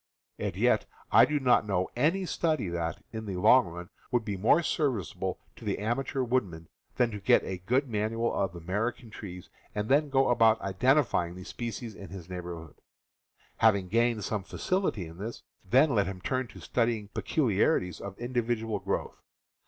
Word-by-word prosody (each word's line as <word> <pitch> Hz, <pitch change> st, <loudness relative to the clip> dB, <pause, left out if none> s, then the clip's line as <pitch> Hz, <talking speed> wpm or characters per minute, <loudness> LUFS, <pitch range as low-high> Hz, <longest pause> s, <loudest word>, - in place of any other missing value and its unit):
And -, -, -2 dB
yet, -, -, +2 dB, 0.2 s
I -, -, +8 dB
do 150 Hz, -1 st, 0 dB
not 125 Hz, -5 st, +3 dB
know 95 Hz, -2 st, +1 dB
any 165 Hz, +10 st, +2 dB
study 155 Hz, -, 0 dB
that, 85 Hz, -1 st, -3 dB
in 110 Hz, -1 st, -5 dB
the 95 Hz, -, -3 dB
long 110 Hz, +7 st, +5 dB
run, 85 Hz, +2 st, -8 dB, 0.2 s
would 120 Hz, -3 st, +1 dB
be 100 Hz, -2 st, -2 dB
more 115 Hz, -, +4 dB
service 130 Hz, -, 0 dB
able -, -, -3 dB, 0.2 s
to -, -, -13 dB
the -, -, -1 dB
amateur 130 Hz, +5 st, -1 dB
woodsman 100 Hz, -10 st, -1 dB, 0.3 s
than 120 Hz, -2 st, +2 dB
to 105 Hz, -, -5 dB
get 100 Hz, -, +4 dB
a 95 Hz, -1 st, -4 dB
good 125 Hz, +9 st, +1 dB
manual 115 Hz, +1 st, -1 dB
of 95 Hz, -3 st, -1 dB
American 105 Hz, +7 st, -3 dB
trees 90 Hz, -4 st, -9 dB, 0.2 s
and 105 Hz, +1 st, -2 dB
then 145 Hz, +2 st, +3 dB
go 135 Hz, -1 st, +3 dB
about 115 Hz, -2 st, +5 dB
identify 120 Hz, -, +2 dB
ing 85 Hz, -, -9 dB
the 90 Hz, -, -8 dB
species 115 Hz, +2 st, -5 dB
in 100 Hz, -3 st, -10 dB
his 90 Hz, -2 st, -9 dB
neighborhood. 85 Hz, -3 st, -7 dB, 0.8 s
Having 100 Hz, -5 st, +3 dB
gained 115 Hz, 0 st, +2 dB
some 105 Hz, 0 st, -2 dB
facility 185 Hz, -, -1 dB
in 80 Hz, +2 st, -11 dB
this, 110 Hz, +4 st, -6 dB, 0.2 s
then 130 Hz, +10 st, +4 dB
let 100 Hz, -5 st, +2 dB
him 95 Hz, -1 st, -5 dB
turn 130 Hz, +5 st, -1 dB
to -, -, -13 dB
studying 115 Hz, -4 st, 0 dB
peculiarities 105 Hz, -, +1 dB
of 100 Hz, -1 st, -7 dB
individual 120 Hz, -2 st, -1 dB
growth. -, -, -3 dB
110 Hz, 175 wpm, -29 LUFS, 95-125 Hz, 0.8 s, I